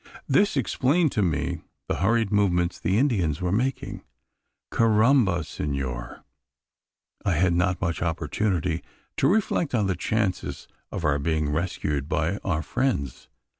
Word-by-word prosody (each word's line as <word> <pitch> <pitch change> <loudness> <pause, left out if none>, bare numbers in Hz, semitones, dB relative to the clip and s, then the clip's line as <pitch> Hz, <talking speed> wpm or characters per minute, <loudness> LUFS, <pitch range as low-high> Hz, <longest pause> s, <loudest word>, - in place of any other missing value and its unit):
This 200 -6 +3
explained 140 +5 +2
to 105 - 0
me 85 -6 0 0.3
the - - -1
hurried 110 +2 +2
movements 90 -4 +2
the 95 +3 +1
Indians 95 - +1
were 90 -1 -1
making. 130 +5 -1 0.7
Carrambo, 110 - +3
senor! 65 -5 -4 1.0
I 100 - +1
had 85 +2 +2
not 90 +1 +1
much 85 -2 -2
opportunity 85 0 -1 0.4
to - - +3
reflect 180 - +1
on 105 -3 +2
the 95 -1 0
chances 95 +2 -2 0.2
of 85 - -3
our 70 -1 +2
being 75 0 0
rescued 75 -3 -2
by 80 +6 0
our 80 -6 -2
friends. 75 - -2
90 Hz, 130 wpm, -25 LUFS, 80-115 Hz, 1.0 s, This